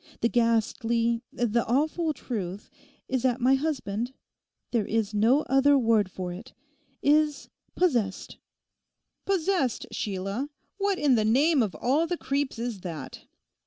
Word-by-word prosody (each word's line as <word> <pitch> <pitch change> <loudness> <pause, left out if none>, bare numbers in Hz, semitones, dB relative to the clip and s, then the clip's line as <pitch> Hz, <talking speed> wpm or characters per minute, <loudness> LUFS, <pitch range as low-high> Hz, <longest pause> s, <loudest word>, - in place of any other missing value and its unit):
The 235 - +3
ghastly, 230 0 +1
the 235 -1 0
awful 310 +6 +1
truth 205 -9 -5 0.4
is 260 -2 -1
that 255 0 +1
my 255 +2 +4
husband—there 245 -4 -4
is 220 -1 -1
no 230 +8 +4
other 275 +1 +4
word 225 -6 +2
for 180 -1 -5
it—is—possessed!' 285 - -2 0.9
'"Possessed," 365 - 0
Sheila! 200 +7 -3 0.3
What 400 -1 +1
in 290 -6 +3
the 220 -3 +3
name 275 +7 +3
of 200 -8 -1
all 280 - +1
the 350 - -2
creeps 275 -3 -2
is 230 -3 -4
that? 160 -7 -7
245 Hz, 120 wpm, -27 LUFS, 220-285 Hz, 0.9 s, my